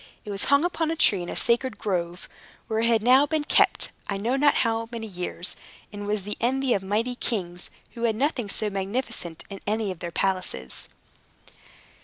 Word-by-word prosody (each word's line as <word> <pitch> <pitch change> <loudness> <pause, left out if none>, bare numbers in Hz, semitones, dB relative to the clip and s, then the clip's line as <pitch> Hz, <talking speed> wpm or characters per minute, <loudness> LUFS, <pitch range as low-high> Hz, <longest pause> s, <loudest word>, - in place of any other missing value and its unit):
It 210 - -5
was 200 0 0
hung 280 +3 +4
upon 330 -2 0
a 325 - 0
tree 200 - +4
in 175 - -5
a - - -4
sacred 240 +3 +1
grove, 175 -4 -2 0.4
where 220 0 -1
it 230 - +3
had 225 -2 +3
now 260 +4 +6
been 310 0 0
kept - - +3 0.2
I 200 - -1
know 230 +6 0
not 285 +1 +4
how 225 0 -1
many 230 -2 -5
years, 180 -2 -4 0.4
and 205 0 -6
was 210 -1 0
the 210 +2 -4
envy 260 +1 +2
of 195 - 0
mighty 215 +6 0
kings, 180 -8 -3 0.2
who 235 - -9
had 225 -2 +2
nothing 255 -3 0
so 210 +1 -2
magnificent 195 -3 -3
in 195 - -6
any 215 -1 0
of 180 - -8
their 175 - -4
palaces. 185 - -2
220 Hz, 195 wpm, -26 LUFS, 195-250 Hz, 0.4 s, now